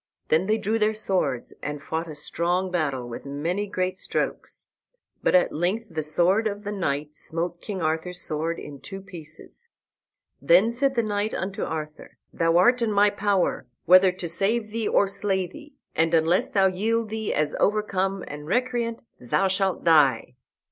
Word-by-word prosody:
Then 165 Hz, +4 st, +3 dB
they 215 Hz, +1 st, +2 dB
drew 225 Hz, +1 st, -1 dB
their 215 Hz, 0 st, +2 dB
swords 180 Hz, -, -1 dB
and 150 Hz, 0 st, -4 dB
fought 160 Hz, +3 st, -4 dB
a 155 Hz, -, -7 dB
strong 175 Hz, +5 st, -1 dB
battle, 140 Hz, -8 st, -1 dB
with 120 Hz, -, -7 dB
many 165 Hz, +9 st, -2 dB
great 185 Hz, -1 st, -2 dB
strokes. -, -, -3 dB, 0.5 s
But -, -, +2 dB
at 180 Hz, -, +4 dB
length 195 Hz, +8 st, -1 dB
the 155 Hz, -, -2 dB
sword 180 Hz, +8 st, +2 dB
of 205 Hz, 0 st, -5 dB
the 205 Hz, -, -4 dB
knight 150 Hz, -6 st, -2 dB
smote 170 Hz, +2 st, -3 dB
King 195 Hz, -5 st, -4 dB
Arthur's 160 Hz, +3 st, -1 dB
sword 160 Hz, +2 st, -2 dB
in 145 Hz, -2 st, -9 dB
two 195 Hz, -, -8 dB
pieces. 175 Hz, -, -9 dB, 0.7 s
Then -, -, +5 dB
said 270 Hz, +3 st, 0 dB
the 235 Hz, -, +2 dB
knight 210 Hz, 0 st, -1 dB
unto 195 Hz, +1 st, -4 dB
Arthur, 155 Hz, -1 st, -6 dB, 0.2 s
"Thou 165 Hz, 0 st, +2 dB
art 245 Hz, +7 st, +4 dB
in 230 Hz, -2 st, +1 dB
my 205 Hz, 0 st, +4 dB
power, 200 Hz, -2 st, 0 dB, 0.2 s
whether 185 Hz, +1 st, +7 dB
to 180 Hz, -1 st, -6 dB
save 210 Hz, +6 st, 0 dB
thee 225 Hz, -1 st, -2 dB
or -, -, +4 dB
slay 195 Hz, -1 st, -1 dB
thee, 295 Hz, -, -13 dB, 0.2 s
and 165 Hz, +1 st, +2 dB
unless 165 Hz, +3 st, +2 dB
thou 195 Hz, -2 st, +3 dB
yield 215 Hz, +4 st, 0 dB
thee 220 Hz, -1 st, -3 dB
as 150 Hz, 0 st, 0 dB
overcome 195 Hz, -2 st, 0 dB
and 150 Hz, +1 st, -8 dB
recreant, 240 Hz, +2 st, -1 dB, 0.2 s
thou 125 Hz, +11 st, +1 dB
shalt 190 Hz, 0 st, 0 dB
die." 140 Hz, -8 st, +4 dB
185 Hz, 170 wpm, -25 LUFS, 160-210 Hz, 0.7 s, whether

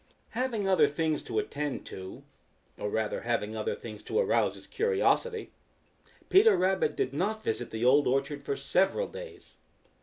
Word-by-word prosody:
Having 230 Hz, -5 st, -1 dB
other 175 Hz, -6 st, +5 dB
things 155 Hz, +1 st, -1 dB
to -, -, -5 dB
attend 150 Hz, -, -2 dB
to, 95 Hz, 0 st, -8 dB, 0.6 s
or 105 Hz, -, -2 dB
rather 110 Hz, 0 st, -1 dB
having 115 Hz, -2 st, -1 dB
other 110 Hz, -, -2 dB
things 110 Hz, -2 st, -9 dB
to -, -, -3 dB
arouse 480 Hz, -, +2 dB
his -, -, -11 dB
curiosity, 455 Hz, 0 st, 0 dB, 0.8 s
Peter 430 Hz, +3 st, +6 dB
Rabbit 185 Hz, -4 st, +1 dB
did 130 Hz, -, -1 dB
not 215 Hz, +8 st, -1 dB
visit 120 Hz, -, -2 dB
the 110 Hz, +2 st, -2 dB
Old 140 Hz, +3 st, +5 dB
Orchard 140 Hz, +2 st, 0 dB
for 140 Hz, 0 st, -3 dB
several 190 Hz, -, +1 dB
days. 450 Hz, -6 st, -10 dB
155 Hz, 155 wpm, -29 LUFS, -, 0.8 s, Peter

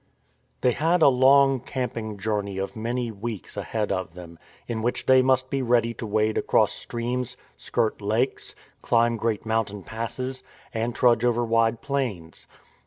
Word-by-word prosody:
They 125 Hz, -, +4 dB
had 160 Hz, +6 st, +2 dB
a -, -, +8 dB
long 135 Hz, +1 st, +5 dB
camping 115 Hz, -4 st, -4 dB
journey 100 Hz, -1 st, -2 dB
of 95 Hz, +5 st, -4 dB
many 120 Hz, +1 st, -2 dB
weeks 110 Hz, -1 st, -6 dB
ahead 110 Hz, -2 st, -2 dB
of 95 Hz, -3 st, -3 dB
them, 85 Hz, -2 st, -11 dB, 0.3 s
in 115 Hz, -2 st, -3 dB
which 120 Hz, +2 st, -1 dB
they 130 Hz, 0 st, +6 dB
must 130 Hz, 0 st, +1 dB
be 135 Hz, -, 0 dB
ready 120 Hz, -2 st, +2 dB
to 115 Hz, -, -6 dB
wade 110 Hz, +1 st, +1 dB
across -, -, +2 dB
streams, 120 Hz, +1 st, -4 dB, 0.2 s
skirt 110 Hz, -1 st, -1 dB
lakes, 110 Hz, +6 st, -1 dB, 0.3 s
climb 115 Hz, 0 st, +2 dB
great 115 Hz, -1 st, -2 dB
mountain 110 Hz, -3 st, -1 dB
passes, 125 Hz, +3 st, -4 dB, 0.3 s
and 115 Hz, +1 st, -2 dB
trudge 120 Hz, -2 st, +3 dB
over 120 Hz, -1 st, +2 dB
wide 115 Hz, 0 st, +2 dB
plains. 120 Hz, -, -3 dB
115 Hz, 155 wpm, -25 LUFS, 110-125 Hz, 0.3 s, a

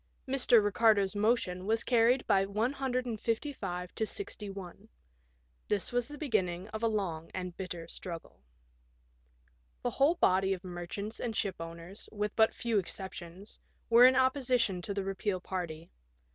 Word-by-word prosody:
Mr. 250 Hz, -5 st, +5 dB
Eicardo's 205 Hz, -1 st, +3 dB
motion 205 Hz, -4 st, +1 dB
was 225 Hz, +1 st, +2 dB
carried 245 Hz, +1 st, +3 dB
by 195 Hz, -, +4 dB
155 230 Hz, -3 st, -2 dB
to -, -, -1 dB
61. 200 Hz, -, -7 dB, 0.8 s
This 205 Hz, -2 st, 0 dB
was 245 Hz, -1 st, 0 dB
the 295 Hz, +1 st, -9 dB
beginning 190 Hz, -, -1 dB
of 220 Hz, 0 st, -5 dB
a 230 Hz, -, +3 dB
long 180 Hz, -7 st, -2 dB
and 180 Hz, -2 st, -4 dB
bitter 175 Hz, -3 st, -6 dB
struggle. 170 Hz, -, -8 dB, 1.4 s
The 245 Hz, -, 0 dB
whole 280 Hz, +8 st, +3 dB
body 190 Hz, -, +3 dB
of 185 Hz, 0 st, -6 dB
merchants 185 Hz, +4 st, -6 dB
and 230 Hz, -2 st, -3 dB
shipowners, 170 Hz, -1 st, -5 dB
with 210 Hz, -1 st, -3 dB
but 220 Hz, 0 st, +5 dB
few 230 Hz, -3 st, +1 dB
exceptions, 190 Hz, +1 st, -8 dB, 0.3 s
were 240 Hz, +2 st, +9 dB
in 260 Hz, -, +4 dB
opposition 255 Hz, -7 st, +2 dB
to 200 Hz, -, -3 dB
the 200 Hz, -, -1 dB
repeal 195 Hz, 0 st, -2 dB
party. 170 Hz, -3 st, -5 dB
205 Hz, 135 wpm, -31 LUFS, 180-235 Hz, 1.4 s, were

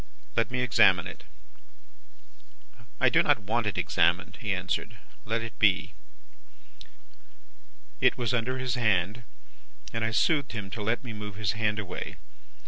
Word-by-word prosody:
'Let 115 Hz, -2 st, +1 dB
me 125 Hz, 0 st, -1 dB
examine 120 Hz, -5 st, +5 dB
it.' -, -, -9 dB, 1.7 s
"'I -, -, +5 dB
do -, -, +4 dB
not -, -, +3 dB
want 110 Hz, +2 st, 0 dB
it 100 Hz, -, -2 dB
examined,' 85 Hz, 0 st, +1 dB
he 110 Hz, -3 st, -1 dB
answered; 90 Hz, -1 st, -2 dB, 0.3 s
'let 115 Hz, +2 st, -1 dB
it 115 Hz, -3 st, -8 dB
be.' 100 Hz, -4 st, +3 dB, 2.1 s
"It -, -, +3 dB
was 120 Hz, 0 st, -1 dB
under 125 Hz, +2 st, 0 dB
his 130 Hz, -1 st, -2 dB
hand, 105 Hz, -2 st, +1 dB, 0.7 s
and 115 Hz, -, -1 dB
I 115 Hz, -, +1 dB
soothed 140 Hz, +4 st, +2 dB
him 100 Hz, -4 st, -5 dB
to 110 Hz, -, -5 dB
let 110 Hz, +5 st, -1 dB
me 120 Hz, -3 st, -6 dB
move 105 Hz, -1 st, -7 dB
his 105 Hz, -3 st, 0 dB
hand 110 Hz, 0 st, 0 dB
away. 100 Hz, -4 st, -5 dB
110 Hz, 145 wpm, -28 LUFS, 100-120 Hz, 2.1 s, examine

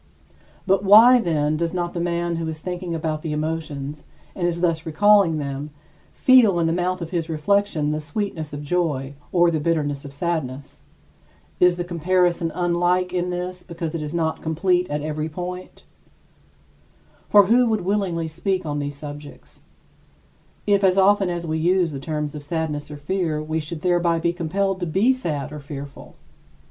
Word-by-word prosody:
But 195 Hz, 0 st, +2 dB
why, 225 Hz, +6 st, +8 dB
then, 155 Hz, -7 st, 0 dB
does 170 Hz, +2 st, -2 dB
not 175 Hz, -1 st, -2 dB
the 175 Hz, -, -3 dB
man 170 Hz, 0 st, -1 dB
who 165 Hz, -1 st, -3 dB
is 160 Hz, -1 st, -5 dB
thinking 180 Hz, 0 st, -4 dB
about 155 Hz, -1 st, -2 dB
the 155 Hz, -2 st, -3 dB
emotions, 150 Hz, -2 st, -4 dB, 0.3 s
and 175 Hz, -2 st, 0 dB
is 170 Hz, 0 st, -2 dB
thus 165 Hz, -2 st, +1 dB
recalling 195 Hz, 0 st, +4 dB
them, 140 Hz, 0 st, -4 dB, 0.4 s
feel 245 Hz, -8 st, +5 dB
in 165 Hz, -, +2 dB
the 165 Hz, -, +1 dB
mouth 180 Hz, 0 st, -1 dB
of 165 Hz, -, -8 dB
his 170 Hz, -3 st, -2 dB
reflection 160 Hz, -1 st, +1 dB
the 155 Hz, -, -1 dB
sweetness 160 Hz, 0 st, -4 dB
of 145 Hz, 0 st, -6 dB
joy 145 Hz, -4 st, -1 dB, 0.2 s
or 175 Hz, -1 st, +4 dB
the 160 Hz, -, 0 dB
bitterness 145 Hz, -3 st, -1 dB
of 140 Hz, -, -9 dB
sadness? 140 Hz, -3 st, -4 dB, 0.8 s
Is 180 Hz, -1 st, +5 dB
the 175 Hz, -, -3 dB
comparison 175 Hz, 0 st, +1 dB
unlike 175 Hz, +1 st, +1 dB
in 180 Hz, 0 st, -1 dB
this 180 Hz, 0 st, -4 dB
because 170 Hz, -2 st, -6 dB
it 165 Hz, -, -3 dB
is 150 Hz, -1 st, -4 dB
not 160 Hz, -1 st, -1 dB
complete 180 Hz, +3 st, 0 dB
at 150 Hz, 0 st, -2 dB
every 155 Hz, 0 st, -3 dB
point? 180 Hz, +3 st, -7 dB, 1.4 s
For 205 Hz, -1 st, +7 dB
who 240 Hz, +4 st, +4 dB
would 220 Hz, -2 st, 0 dB
willingly 180 Hz, -4 st, -1 dB
speak 185 Hz, +3 st, -2 dB
on 145 Hz, -1 st, -2 dB
these 145 Hz, 0 st, -4 dB
subjects, 145 Hz, 0 st, -11 dB, 1.0 s
if 200 Hz, -1 st, +2 dB
as 190 Hz, 0 st, +4 dB
often 195 Hz, 0 st, +4 dB
as 175 Hz, -1 st, -3 dB
we 160 Hz, 0 st, -2 dB
used 175 Hz, -1 st, +2 dB
the 135 Hz, -, -5 dB
term 150 Hz, +1 st, -3 dB
sadness 150 Hz, 0 st, -4 dB
or 150 Hz, -, -7 dB
fear, 160 Hz, 0 st, -2 dB
we 155 Hz, +1 st, -2 dB
should 155 Hz, 0 st, -6 dB
thereby 175 Hz, -1 st, +2 dB
be 170 Hz, +1 st, 0 dB
compelled 190 Hz, +3 st, -1 dB
to 175 Hz, -, -2 dB
be 200 Hz, +11 st, +3 dB
sad 155 Hz, -, -4 dB
or 150 Hz, -, -6 dB
fearful? 140 Hz, -1 st, -9 dB
170 Hz, 175 wpm, -22 LUFS, 155-180 Hz, 1.4 s, why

